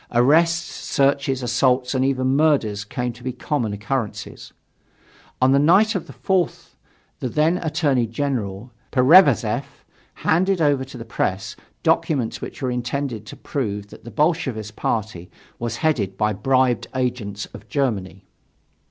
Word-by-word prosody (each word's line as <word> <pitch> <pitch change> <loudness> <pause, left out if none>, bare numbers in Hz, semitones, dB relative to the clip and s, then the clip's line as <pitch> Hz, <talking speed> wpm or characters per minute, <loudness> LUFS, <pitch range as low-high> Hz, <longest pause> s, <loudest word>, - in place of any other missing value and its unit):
Arrests, 165 +8 +2
searches, 135 -1 +1
assaults 125 +2 +2
and 130 -1 +1
even 130 0 +1
murders 135 -10 +2
came 125 +3 -3
to 120 +1 -15
be 130 - -2
common 125 -2 -2
occurrences. 105 +2 -4 0.9
On 130 +1 +4
the 140 - +5
night 190 +9 +5
of 190 - -3
the - - -11
4th 185 -3 -1 0.5
the 130 - -2
then 160 +7 +2
Attorney 150 -7 +1
General, 115 -3 -3 0.2
Pereverzev, 135 - +4 0.3
handed 185 +3 +1
over 145 -4 +2
to 130 -1 -11
the 115 - -8
press 95 -4 -2 0.3
"documents" 130 -8 +1
which - - -7
were 130 - 0
intended 125 -2 -3
to - - -8
prove 105 -7 -4
that - - -13
the 120 - -9
Bolshevist 135 - -1
party 105 -6 -3 0.3
was 120 0 -3
headed 100 -12 0
by 105 0 +1
bribed 130 +3 +1
agents 120 -6 -2
of - - -12
Germany. 100 - -2
130 Hz, 140 wpm, -22 LUFS, 110-145 Hz, 0.9 s, the